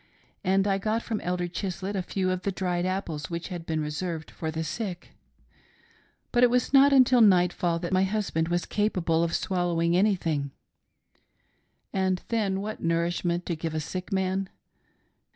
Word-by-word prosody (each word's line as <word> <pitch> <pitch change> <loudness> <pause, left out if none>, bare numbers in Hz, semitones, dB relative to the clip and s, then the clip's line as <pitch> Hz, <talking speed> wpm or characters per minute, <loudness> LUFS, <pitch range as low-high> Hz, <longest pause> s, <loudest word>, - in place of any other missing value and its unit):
And 195 +1 +2
I 195 -1 +1
got 220 +3 -1
from 220 -3 -3
Elder 180 0 -1
Chislett 185 +3 -4
a 190 - 0
few 185 +1 -1
of 185 0 -2
the 200 - -1
dried 180 -1 -1
apples 185 -5 -3
which 170 +2 -4
had 175 -3 -6
been 160 -1 -1
reserved 155 +2 -4
for 160 - -4
the 160 +1 -3
sick; 180 +1 -5 1.2
but 240 - +2
it 245 - +7
was 250 +2 +1
not 275 +1 +7
until 255 -2 +6
nightfall 180 -4 +4
that 175 +2 -4
my 185 0 +4
husband 190 -5 0
was 175 0 0
capable 180 -6 +1
of 170 - 0
swallowing 175 -2 0
anything 175 -8 +1 0.7
— - - -45
and 185 -1 0
then, 200 -4 0
what 215 +1 -5
nourishment 170 +1 0
to 170 - -2
give 160 0 -4
to - - -2
a - - +1
sick 180 +5 -5
man 190 0 0
180 Hz, 170 wpm, -27 LUFS, 170-195 Hz, 1.2 s, it